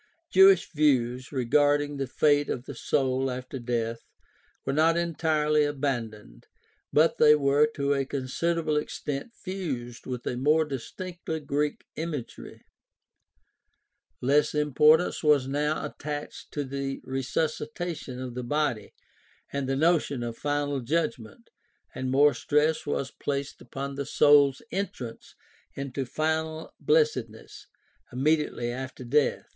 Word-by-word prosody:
Jewish 190 Hz, -1 st, +6 dB
views 130 Hz, -5 st, +1 dB
regarding 145 Hz, +2 st, +2 dB
the 135 Hz, -1 st, -2 dB
fate 145 Hz, +2 st, +2 dB
of 125 Hz, -, -3 dB
the 140 Hz, -, -7 dB
soul 130 Hz, +1 st, 0 dB
after 130 Hz, +1 st, -5 dB
death 115 Hz, -1 st, -2 dB, 0.7 s
were 135 Hz, -, -1 dB
not 160 Hz, +3 st, +3 dB
entirely 155 Hz, -3 st, +1 dB
abandoned, 130 Hz, -7 st, -3 dB, 0.4 s
but 155 Hz, +2 st, +3 dB
they 150 Hz, 0 st, +7 dB
were 145 Hz, +1 st, +3 dB
to 140 Hz, 0 st, +1 dB
a 140 Hz, -1 st, +1 dB
considerable 155 Hz, +4 st, -1 dB
extent 150 Hz, -, -4 dB
fused 145 Hz, -12 st, -5 dB
with 125 Hz, -2 st, -5 dB
a -, -, -2 dB
more 155 Hz, +5 st, +3 dB
distinctly 160 Hz, +4 st, -5 dB
Greek 145 Hz, 0 st, -2 dB
imagery. 155 Hz, -6 st, -6 dB, 1.6 s
Less 145 Hz, +4 st, +3 dB
importance 150 Hz, +3 st, +4 dB
was 150 Hz, -4 st, +3 dB
now 150 Hz, +3 st, -1 dB
attached 145 Hz, 0 st, -6 dB
to 145 Hz, -, -1 dB
the 135 Hz, 0 st, -4 dB
resusci 135 Hz, +4 st, -2 dB
tation 165 Hz, -7 st, -5 dB
of 130 Hz, -1 st, -5 dB
the 125 Hz, +1 st, -5 dB
body 145 Hz, -3 st, -1 dB, 0.6 s
and 140 Hz, -1 st, -2 dB
the 135 Hz, -, +1 dB
notion 150 Hz, -4 st, +2 dB
of 115 Hz, -1 st, -4 dB
final 145 Hz, 0 st, -1 dB
judgment, 130 Hz, -, -3 dB, 0.4 s
and 130 Hz, -, -3 dB
more 145 Hz, +3 st, +5 dB
stress 150 Hz, +2 st, +1 dB
was 140 Hz, -2 st, -2 dB
placed 140 Hz, -1 st, -4 dB
upon 135 Hz, +3 st, -6 dB
the 140 Hz, 0 st, -4 dB
soul's 145 Hz, -2 st, +5 dB
entrance 135 Hz, -, -5 dB, 0.4 s
into 135 Hz, -1 st, -4 dB
final 160 Hz, +2 st, -2 dB
blessed 150 Hz, -5 st, +2 dB
ness 110 Hz, +1 st, -14 dB, 0.4 s
immediately 135 Hz, -2 st, 0 dB
after 130 Hz, +1 st, -6 dB
death 140 Hz, +4 st, +1 dB
(e. -, -, -34 dB
145 Hz, 130 wpm, -27 LUFS, 130-155 Hz, 1.6 s, they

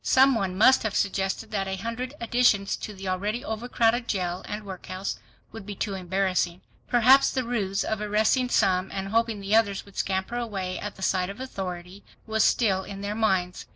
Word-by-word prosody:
Some 265 Hz, +1 st, +5 dB
one 190 Hz, -5 st, -1 dB
must 260 Hz, +6 st, +6 dB
have 220 Hz, -3 st, -2 dB
suggested 195 Hz, +2 st, -1 dB
that 195 Hz, -2 st, -1 dB
a 190 Hz, -, -2 dB
hundred 230 Hz, +7 st, -5 dB
additions 235 Hz, -4 st, +2 dB
to -, -, -6 dB
the 195 Hz, -1 st, -8 dB
already 205 Hz, +6 st, -2 dB
overcrowded 235 Hz, +1 st, 0 dB
jail 180 Hz, -2 st, -2 dB
and 210 Hz, 0 st, -5 dB
workhouse 185 Hz, 0 st, -5 dB, 0.3 s
would 225 Hz, -, -9 dB
be 205 Hz, 0 st, -7 dB
too 200 Hz, +1 st, -3 dB
embarrassing. 185 Hz, -1 st, -1 dB, 0.3 s
Perhaps 260 Hz, +3 st, +6 dB
the 260 Hz, -, -1 dB
ruse 200 Hz, -5 st, -1 dB
of 220 Hz, -1 st, -2 dB
arresting 215 Hz, +5 st, +2 dB
some, 190 Hz, -4 st, +2 dB
and 195 Hz, 0 st, -4 dB
hoping 225 Hz, -1 st, 0 dB
the 200 Hz, +2 st, +1 dB
others 205 Hz, -3 st, +2 dB
would 200 Hz, -, -17 dB
scamper 190 Hz, +5 st, -1 dB
away 195 Hz, -6 st, -3 dB
at 205 Hz, -, -6 dB
the 190 Hz, -, -8 dB
sight 185 Hz, -1 st, +1 dB
of 200 Hz, +4 st, -8 dB
authority, 190 Hz, -6 st, -6 dB, 0.2 s
was 220 Hz, -1 st, +1 dB
still 195 Hz, -5 st, +2 dB
in 195 Hz, 0 st, -8 dB
their 200 Hz, +1 st, -3 dB
minds. 190 Hz, -5 st, 0 dB
200 Hz, 190 wpm, -26 LUFS, 190-225 Hz, 0.3 s, must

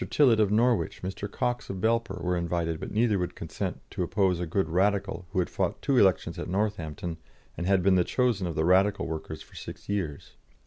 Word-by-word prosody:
Tillett, 125 Hz, -7 st, +4 dB
of 105 Hz, -2 st, +4 dB
Norwich, 115 Hz, +1 st, +1 dB
Mr. 95 Hz, +2 st, -4 dB
Cox, 125 Hz, +1 st, -2 dB
of 95 Hz, -, -4 dB
Belper, 115 Hz, +4 st, 0 dB
were 90 Hz, 0 st, +1 dB
invited, 85 Hz, -2 st, -1 dB
but -, -, -5 dB
neither 110 Hz, -2 st, +2 dB
would 90 Hz, -, -3 dB
consent -, -, -4 dB
to -, -, -4 dB
oppose 95 Hz, -2 st, +1 dB
a 90 Hz, -, -2 dB
good 90 Hz, +1 st, 0 dB
Radical 95 Hz, +1 st, 0 dB
who 95 Hz, -, -6 dB
had 90 Hz, -, +2 dB
fought -, -, -2 dB
two 140 Hz, -, 0 dB
elections 95 Hz, -5 st, +2 dB
at -, -, -5 dB
Northampton 90 Hz, -5 st, -2 dB, 0.4 s
and 85 Hz, -, -3 dB
had 95 Hz, -2 st, +3 dB
been 95 Hz, 0 st, +5 dB
the 90 Hz, -1 st, +4 dB
chosen 115 Hz, -4 st, +1 dB
of 85 Hz, -, -4 dB
the 80 Hz, -, +1 dB
Radical 95 Hz, +3 st, +3 dB
workers 80 Hz, -1 st, -5 dB
for -, -, -22 dB
six -, -, -9 dB
years. 85 Hz, -9 st, -3 dB
95 Hz, 210 wpm, -28 LUFS, 85-105 Hz, 0.4 s, been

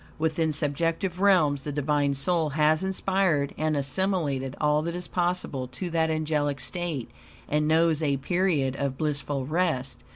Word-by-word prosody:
Within 160 Hz, 0 st, 0 dB
subjective 165 Hz, +5 st, -1 dB
realms 155 Hz, -9 st, +4 dB
the 150 Hz, -, -4 dB
Divine 145 Hz, 0 st, +1 dB
soul 160 Hz, +2 st, +1 dB
has 155 Hz, +2 st, +3 dB
inspired 190 Hz, -6 st, +1 dB
and 155 Hz, -1 st, 0 dB
assimilated 140 Hz, -3 st, -1 dB
all 150 Hz, 0 st, +2 dB
that 170 Hz, +2 st, -3 dB
is 180 Hz, -1 st, -5 dB
possible 175 Hz, -7 st, -1 dB
to 150 Hz, +8 st, -6 dB
that 160 Hz, -1 st, +1 dB
angelic 150 Hz, -3 st, 0 dB
state, 170 Hz, -9 st, -4 dB, 0.4 s
and 150 Hz, +1 st, +1 dB
knows 160 Hz, 0 st, +3 dB
a 140 Hz, -3 st, +1 dB
period 150 Hz, -3 st, 0 dB
of 140 Hz, -2 st, -2 dB
blissful 145 Hz, -3 st, -2 dB
rest. 155 Hz, -5 st, -1 dB
155 Hz, 150 wpm, -26 LUFS, 140-170 Hz, 0.4 s, realms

